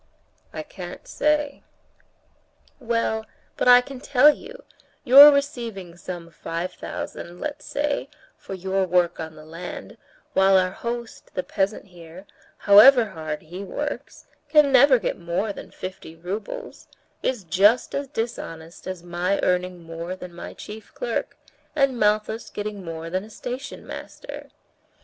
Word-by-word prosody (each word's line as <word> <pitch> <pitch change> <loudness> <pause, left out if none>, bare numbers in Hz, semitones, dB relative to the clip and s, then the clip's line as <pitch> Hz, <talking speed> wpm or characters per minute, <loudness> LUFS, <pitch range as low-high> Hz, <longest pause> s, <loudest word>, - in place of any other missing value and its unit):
"I - - -5
can't - - -9
say." 295 - 0 1.2
"Well, 230 -2 0 0.3
but - - -1
I 245 0 +9
can 265 0 -9
tell 285 +3 +6
you: - - -12 0.4
your 280 +3 +11
receiving 235 - -2
some 175 -1 -8
five 170 +3 -4
thousand, 175 +1 -7
let's 295 -1 -5
say, 285 -1 -2 0.3
for 290 -11 -8
your 190 +1 0
work 175 -1 +2
on 160 -1 -6
the 155 0 -13
land, 165 +3 -8 0.4
while 190 0 +5
our 185 -1 +2
host, 235 +3 -6
the 185 - -1
peasant 195 +2 -1
here, 175 0 -13 0.3
however 225 +5 +8
hard 155 -4 -5
he 180 +5 -8
works, 290 +9 -5 0.2
can 295 -2 +5
never 265 0 +7
get 220 - -3
more 175 +5 -2
than - - -10
fifty 185 -3 -8
roubles, 215 - -6 0.3
is 250 -6 -1
just 200 +8 +3
as 280 0 -2
dishonest 185 - -6
as 185 -2 -5
my 175 +3 -1
earning 180 -1 0
more 165 +2 -6
than 180 -1 -10
my 170 - -8
chief 215 +1 -10
clerk, - - -3 0.4
and 275 -4 +2
Malthus 215 +2 +1
getting 205 -1 -5
more 165 -1 -6
than 185 +2 -1
a 215 - -12
station 250 +5 -7
master. - - -9
200 Hz, 140 wpm, -24 LUFS, 175-255 Hz, 1.2 s, your